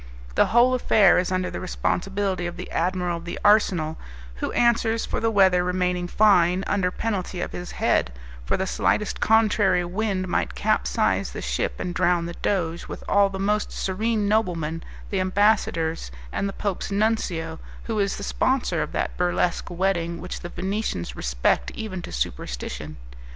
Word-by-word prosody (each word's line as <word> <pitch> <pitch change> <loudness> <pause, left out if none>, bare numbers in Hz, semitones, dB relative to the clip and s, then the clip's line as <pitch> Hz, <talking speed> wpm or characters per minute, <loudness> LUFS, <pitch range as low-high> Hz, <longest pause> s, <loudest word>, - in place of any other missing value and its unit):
The - - +4
whole 240 +3 +4
affair 210 -7 +5
is 180 0 -1
under 185 -1 -1
the - - -4
responsibility 190 0 -1
of 175 +1 -7
the 180 - -7
admiral 180 0 0
of 170 - -10
the 175 - -5
arsenal, 180 -7 +3 0.4
who - - -3
answers 230 -1 +2
for - - -2
the 225 - +1
weather 190 -4 +4
remaining 180 0 0
fine, 185 -2 +4
under 190 -3 +1
penalty 190 -2 -3
of - - -3
his 180 0 -7
head, 60 - +1 0.3
for - - 0
the - - -1
slightest 210 - 0
contrary 215 -5 +3
wind 190 0 -1
might 65 - -1
capsize - - +1
the - - -5
ship - - -1
and 180 - -3
drown 175 -1 +2
the 170 - -5
Doge, 170 -3 -2
with - - -7
all 200 -1 +4
the 195 - -6
most 210 +2 0
serene 210 +2 -1
noblemen, 170 -7 0 0.3
the 195 - 0
ambassadors, 185 - +1 0.2
and 200 - -1
the - - -6
Pope's 200 -2 -3
nuncio, 195 -6 -1 0.2
who 225 -2 -2
is 200 -1 +1
the 200 - -6
sponsor 260 +5 0
of - - -4
that - - -2
burlesque 180 -1 0
wedding 170 -2 -1
which 180 - -6
the 175 - -7
Venetians 190 - -3
respect 60 +1 0
even 190 -5 -5
to - - -8
superstition. 60 +5 -4
185 Hz, 165 wpm, -24 LUFS, 170-205 Hz, 0.4 s, affair